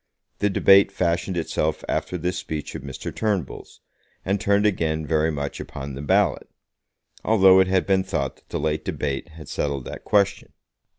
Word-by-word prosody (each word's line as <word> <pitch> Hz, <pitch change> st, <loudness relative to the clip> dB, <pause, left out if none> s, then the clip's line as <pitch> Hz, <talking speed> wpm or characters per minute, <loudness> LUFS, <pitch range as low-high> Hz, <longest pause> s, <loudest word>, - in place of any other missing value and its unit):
The 105 Hz, -, +2 dB
debate 100 Hz, 0 st, +5 dB
fashioned 85 Hz, 0 st, -1 dB
itself 80 Hz, -1 st, -1 dB
after 90 Hz, -, -2 dB
this 90 Hz, +1 st, -2 dB
speech 80 Hz, -5 st, -5 dB
of -, -, -6 dB
Mr. 65 Hz, 0 st, -7 dB
Turnbull's, 100 Hz, -, -3 dB, 0.4 s
and 100 Hz, +1 st, 0 dB
turned 100 Hz, 0 st, +2 dB
again 80 Hz, -6 st, 0 dB
very 80 Hz, +1 st, +1 dB
much 70 Hz, -2 st, -4 dB
upon 70 Hz, 0 st, -7 dB
the 70 Hz, -, -6 dB
ballot, 70 Hz, -, +1 dB, 0.7 s
although 95 Hz, -4 st, +6 dB
it 95 Hz, -, +4 dB
had 95 Hz, -1 st, +1 dB
been 95 Hz, -1 st, +2 dB
thought 70 Hz, -6 st, -3 dB
that -, -, -29 dB
the -, -, -3 dB
late 80 Hz, 0 st, -1 dB
debate 70 Hz, +2 st, -3 dB
had 80 Hz, -3 st, -12 dB
settled 70 Hz, -3 st, -2 dB
that -, -, -8 dB
question. 100 Hz, -2 st, +1 dB
85 Hz, 170 wpm, -23 LUFS, 75-95 Hz, 0.7 s, although